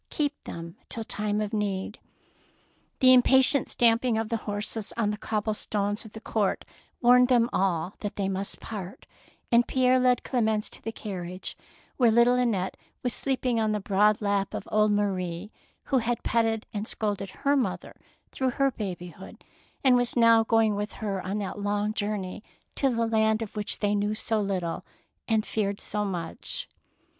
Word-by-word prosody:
Keep 290 Hz, -1 st, -2 dB
them 170 Hz, 0 st, -8 dB
till 225 Hz, -, -4 dB
time 210 Hz, -2 st, -2 dB
of 210 Hz, +1 st, -3 dB
need." 205 Hz, -1 st, -2 dB, 1.0 s
The 255 Hz, 0 st, +8 dB
impatient 265 Hz, +2 st, +5 dB
stamping 230 Hz, 0 st, +3 dB
of 220 Hz, -1 st, -2 dB
the 230 Hz, -, 0 dB
horses 205 Hz, +1 st, -3 dB
on 215 Hz, -3 st, +1 dB
the -, -, -2 dB
cobblestones 210 Hz, -1 st, -2 dB
of 215 Hz, -, -12 dB
the 220 Hz, -, -8 dB
court, 215 Hz, -3 st, -1 dB, 0.4 s
warned 250 Hz, 0 st, +6 dB
them 240 Hz, -2 st, +3 dB
all 185 Hz, -1 st, 0 dB
that 205 Hz, -, -5 dB
they 200 Hz, -1 st, -1 dB
must 195 Hz, +1 st, -2 dB
part, 200 Hz, -4 st, -7 dB, 0.5 s
and 235 Hz, 0 st, +5 dB
Pierre 255 Hz, 0 st, +3 dB
led 250 Hz, -1 st, +3 dB
Clemence 220 Hz, -4 st, 0 dB
to -, -, -12 dB
the 225 Hz, -, -4 dB
carriage, 185 Hz, -4 st, -6 dB, 0.4 s
where 245 Hz, -3 st, +5 dB
little 235 Hz, +2 st, +5 dB
Annette 230 Hz, -7 st, 0 dB, 0.3 s
was 245 Hz, -2 st, -1 dB
sleeping 255 Hz, -3 st, 0 dB
on 215 Hz, -1 st, +1 dB
the 210 Hz, -, 0 dB
broad 210 Hz, +2 st, +2 dB
lap 200 Hz, -1 st, 0 dB
of -, -, -6 dB
old 215 Hz, -1 st, +3 dB
Marie, 190 Hz, -2 st, -1 dB, 0.3 s
who 265 Hz, -, +1 dB
had 235 Hz, 0 st, -2 dB
petted 225 Hz, -1 st, +1 dB
and 210 Hz, 0 st, -3 dB
scolded 205 Hz, -2 st, -2 dB
her 280 Hz, +8 st, 0 dB
mother 265 Hz, -4 st, -2 dB, 0.4 s
through 260 Hz, -1 st, 0 dB
her 275 Hz, +2 st, +1 dB
babyhood 180 Hz, -4 st, -7 dB, 0.4 s
and 260 Hz, -2 st, +6 dB
was 245 Hz, -1 st, +1 dB
now 230 Hz, -1 st, +6 dB
going 225 Hz, -1 st, +3 dB
with 205 Hz, +1 st, -3 dB
her 200 Hz, -4 st, -3 dB
on 195 Hz, +3 st, -3 dB
that 205 Hz, 0 st, -4 dB
long 205 Hz, +1 st, -1 dB
journey 205 Hz, -2 st, -3 dB, 0.3 s
to 275 Hz, -, +1 dB
the 230 Hz, -2 st, 0 dB
land 220 Hz, 0 st, +2 dB
of 220 Hz, -, -9 dB
which 210 Hz, -1 st, -3 dB
they 205 Hz, -1 st, 0 dB
knew 205 Hz, +1 st, 0 dB
so 220 Hz, 0 st, 0 dB
little 185 Hz, -4 st, -2 dB, 0.4 s
and 220 Hz, -2 st, +1 dB
feared 200 Hz, -2 st, -1 dB
so 210 Hz, -, -2 dB
much. 180 Hz, -5 st, -4 dB
215 Hz, 170 wpm, -27 LUFS, 200-235 Hz, 1.0 s, The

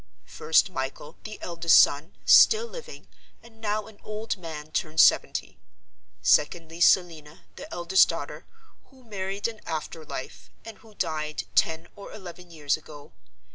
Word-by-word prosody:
First, 160 Hz, +4 st, +1 dB
Michael, 135 Hz, +1 st, -6 dB
the 215 Hz, 0 st, -8 dB
eldest 170 Hz, -1 st, +4 dB
son, 150 Hz, +5 st, +2 dB
still 445 Hz, +1 st, +7 dB
living, 475 Hz, 0 st, -11 dB, 0.4 s
and 225 Hz, -1 st, -19 dB
now 210 Hz, -1 st, -2 dB
an 220 Hz, -2 st, -16 dB
old 215 Hz, +1 st, -4 dB
man 160 Hz, -5 st, -9 dB
turned 155 Hz, +1 st, -2 dB
seventy. -, -, +3 dB, 0.6 s
Secondly, 165 Hz, +2 st, +1 dB
Selina, 165 Hz, -5 st, +2 dB
the -, -, -10 dB
eldest 175 Hz, +2 st, +3 dB
daughter, -, -, -6 dB, 0.4 s
who 260 Hz, -1 st, -22 dB
married 200 Hz, -2 st, -4 dB
in 225 Hz, -2 st, -9 dB
after 160 Hz, 0 st, -5 dB
life, 140 Hz, -3 st, -8 dB, 0.2 s
and 225 Hz, -, -10 dB
who 220 Hz, -2 st, -19 dB
died 155 Hz, -4 st, -3 dB
ten 160 Hz, +1 st, +1 dB
or 200 Hz, -, -11 dB
eleven 180 Hz, -3 st, -11 dB
years 150 Hz, -4 st, -1 dB
ago. 150 Hz, -2 st, -14 dB
170 Hz, 140 wpm, -26 LUFS, 155-210 Hz, 0.6 s, still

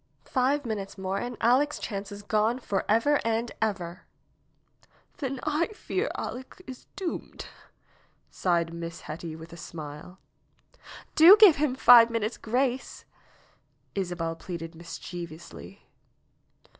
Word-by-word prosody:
Five 275 Hz, +2 st, +1 dB
minutes 205 Hz, -4 st, -4 dB
more 190 Hz, +1 st, -2 dB
and 245 Hz, 0 st, -5 dB
Aleck's 265 Hz, +6 st, +3 dB
chance 200 Hz, -2 st, -5 dB
is 205 Hz, 0 st, -9 dB
gone 215 Hz, +3 st, +1 dB
forever 230 Hz, +5 st, +1 dB
and 230 Hz, +1 st, -1 dB
ever 185 Hz, -5 st, -3 dB, 0.5 s
!" -, -, -35 dB
^'Then 270 Hz, -3 st, -3 dB
I 305 Hz, +2 st, +1 dB
fear 410 Hz, +2 st, -2 dB
Aleck 260 Hz, +6 st, -6 dB
is 260 Hz, -1 st, -10 dB
doomed!" 370 Hz, -4 st, -5 dB, 0.9 s
sighed 170 Hz, -2 st, 0 dB
Miss 170 Hz, 0 st, -6 dB
Hetty 160 Hz, +1 st, -7 dB
with 160 Hz, +1 st, -11 dB
a -, -, -10 dB
smile. 160 Hz, +2 st, -9 dB, 1.0 s
''Do 345 Hz, +7 st, +10 dB
give 415 Hz, -7 st, +8 dB
him 285 Hz, -3 st, +1 dB
five 235 Hz, -2 st, +8 dB
minutes' 230 Hz, -1 st, -2 dB
grace!" 250 Hz, +3 st, -2 dB, 0.9 s
Isabel 175 Hz, -4 st, -3 dB
pleaded 165 Hz, -1 st, -7 dB
mischievously. 170 Hz, 0 st, -9 dB
215 Hz, 120 wpm, -27 LUFS, 175-260 Hz, 1.0 s, Do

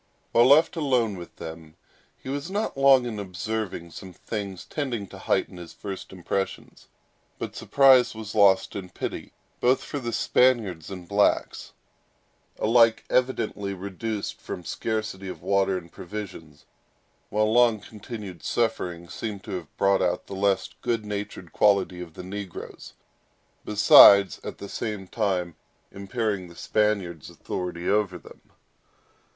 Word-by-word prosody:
While 120 Hz, +1 st, +5 dB
left 155 Hz, +6 st, +5 dB
alone 125 Hz, -9 st, +1 dB
with 85 Hz, -2 st, -10 dB
them, 80 Hz, -1 st, -9 dB, 0.4 s
he -, -, -14 dB
was 140 Hz, +5 st, -3 dB
not 205 Hz, +3 st, -2 dB
long 135 Hz, -2 st, +5 dB
in 110 Hz, -3 st, -4 dB
observing 95 Hz, -2 st, -4 dB
some 95 Hz, +1 st, -10 dB
things 100 Hz, -1 st, -6 dB
tending 125 Hz, -8 st, -3 dB
to -, -, -11 dB
heighten -, -, -1 dB
his 85 Hz, -2 st, -10 dB
first 100 Hz, -2 st, -7 dB
impressions; 95 Hz, +1 st, -4 dB, 0.5 s
but -, -, -6 dB
surprise 130 Hz, -4 st, +5 dB
was 110 Hz, -1 st, -7 dB
lost 100 Hz, -2 st, +4 dB
in 95 Hz, -2 st, -6 dB
pity, -, -, -6 dB, 0.3 s
both 125 Hz, +2 st, +2 dB
for 145 Hz, -, -5 dB
the 120 Hz, -3 st, -4 dB
Spaniards 110 Hz, -8 st, +2 dB
and 90 Hz, -3 st, -8 dB
blacks, 100 Hz, +2 st, +1 dB, 0.8 s
alike 115 Hz, 0 st, +4 dB
evidently 105 Hz, -6 st, 0 dB
reduced 100 Hz, +3 st, -5 dB
from 90 Hz, -, -7 dB
scarcity 110 Hz, -3 st, -3 dB
of 85 Hz, -3 st, -8 dB
water 95 Hz, 0 st, +2 dB
and 85 Hz, -2 st, -10 dB
provisions; 85 Hz, -7 st, -8 dB, 0.6 s
while 110 Hz, +1 st, +1 dB
long 120 Hz, -2 st, +4 dB
continued 105 Hz, -2 st, -9 dB
suffering 90 Hz, -7 st, -1 dB
seemed 105 Hz, +1 st, -6 dB
to -, -, -8 dB
have 85 Hz, -5 st, -7 dB
brought 100 Hz, 0 st, +3 dB
out 90 Hz, -, 0 dB
the -, -, -9 dB
less 95 Hz, 0 st, +1 dB
good 115 Hz, -3 st, -1 dB
natured 100 Hz, -4 st, -6 dB
qualities 100 Hz, -3 st, +2 dB
of 85 Hz, -3 st, -10 dB
the -, -, -8 dB
negroes, 95 Hz, -1 st, -8 dB, 0.7 s
besides, 100 Hz, -2 st, +7 dB
at -, -, -6 dB
the 100 Hz, -, -8 dB
same 105 Hz, -3 st, -4 dB
time, 90 Hz, -5 st, -1 dB, 0.4 s
impairing 100 Hz, -1 st, -3 dB
the 85 Hz, -, -14 dB
Spaniard's 95 Hz, -5 st, -1 dB
authority 90 Hz, -1 st, -5 dB
over 100 Hz, -3 st, +1 dB
them. 80 Hz, -, -15 dB
100 Hz, 140 wpm, -25 LUFS, 90-115 Hz, 0.8 s, besides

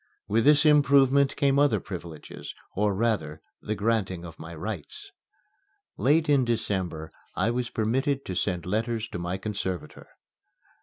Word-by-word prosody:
With 115 Hz, +3 st, +2 dB
this 150 Hz, +1 st, +6 dB
improvement 140 Hz, -2 st, +5 dB
came 140 Hz, 0 st, +2 dB
other 145 Hz, -8 st, +4 dB
privileges 85 Hz, -5 st, -8 dB, 0.2 s
or, 105 Hz, 0 st, +1 dB
rather, 95 Hz, -9 st, -1 dB, 0.2 s
the 110 Hz, -, -3 dB
granting 100 Hz, -5 st, -1 dB
of 85 Hz, -2 st, -11 dB
my 80 Hz, +1 st, -8 dB
rights. 85 Hz, -1 st, -7 dB, 0.8 s
Late 150 Hz, +8 st, +3 dB
in 140 Hz, -3 st, +4 dB
December 95 Hz, -9 st, -2 dB, 0.2 s
I 115 Hz, -, +1 dB
was 125 Hz, 0 st, -2 dB
permitted 135 Hz, +6 st, 0 dB
to 95 Hz, -, -4 dB
send 90 Hz, -1 st, -1 dB
letters 110 Hz, +3 st, -1 dB
to -, -, -5 dB
my 90 Hz, +2 st, -2 dB
conservator. 95 Hz, -5 st, -5 dB
110 Hz, 140 wpm, -27 LUFS, 90-135 Hz, 0.8 s, this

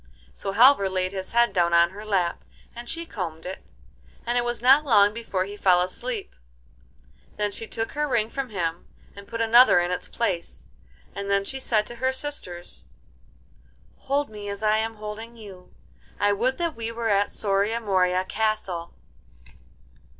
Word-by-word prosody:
So 195 Hz, -, -4 dB
Halvor 230 Hz, -3 st, +6 dB
laid 185 Hz, 0 st, -1 dB
his 190 Hz, -1 st, -6 dB
head 235 Hz, 0 st, +3 dB
down 170 Hz, -1 st, +2 dB
on 170 Hz, +1 st, +5 dB
her 205 Hz, +2 st, -9 dB
lap, 190 Hz, -5 st, -1 dB, 0.3 s
and 240 Hz, +1 st, -8 dB
she 335 Hz, 0 st, -3 dB
combed 170 Hz, -, -6 dB
it, 185 Hz, +1 st, -7 dB, 0.6 s
and 240 Hz, +1 st, -1 dB
it 245 Hz, -, +2 dB
was 240 Hz, 0 st, -2 dB
not 270 Hz, +5 st, +6 dB
long 205 Hz, -7 st, +4 dB
before 220 Hz, -5 st, -2 dB
he 200 Hz, +1 st, -8 dB
fell 185 Hz, -3 st, +4 dB
asleep. 205 Hz, +5 st, -3 dB, 1.0 s
Then 210 Hz, -1 st, 0 dB
she 225 Hz, +2 st, -6 dB
took 225 Hz, 0 st, -3 dB
her 295 Hz, +1 st, -1 dB
ring 235 Hz, -5 st, +1 dB
from 265 Hz, +2 st, -4 dB
him 170 Hz, -5 st, -3 dB, 0.3 s
and 200 Hz, 0 st, -12 dB
put 230 Hz, +1 st, -4 dB
another 230 Hz, -3 st, +6 dB
in 175 Hz, 0 st, -1 dB
its 180 Hz, -, -3 dB
place, 170 Hz, -, -3 dB, 0.4 s
and 200 Hz, 0 st, -5 dB
then 200 Hz, 0 st, +2 dB
she 265 Hz, +6 st, -3 dB
said 215 Hz, -5 st, +1 dB
to 240 Hz, -, -9 dB
her 260 Hz, +2 st, +1 dB
sisters: 260 Hz, -11 st, -4 dB, 1.1 s
'Hold 285 Hz, +1 st, -1 dB
me 205 Hz, -1 st, -7 dB
as 200 Hz, +1 st, -6 dB
I 215 Hz, 0 st, +3 dB
am 225 Hz, +1 st, -2 dB
holding 215 Hz, +2 st, -8 dB
you. 195 Hz, -5 st, -12 dB, 0.5 s
I 205 Hz, 0 st, +3 dB
would 245 Hz, +6 st, 0 dB
that 335 Hz, -2 st, -2 dB
we 230 Hz, 0 st, -4 dB
were 230 Hz, 0 st, -2 dB
at 200 Hz, 0 st, +2 dB
Soria 205 Hz, +2 st, 0 dB
Moria 185 Hz, -3 st, +1 dB
Castle. 205 Hz, -6 st, -2 dB
210 Hz, 170 wpm, -25 LUFS, 190-235 Hz, 1.1 s, Halvor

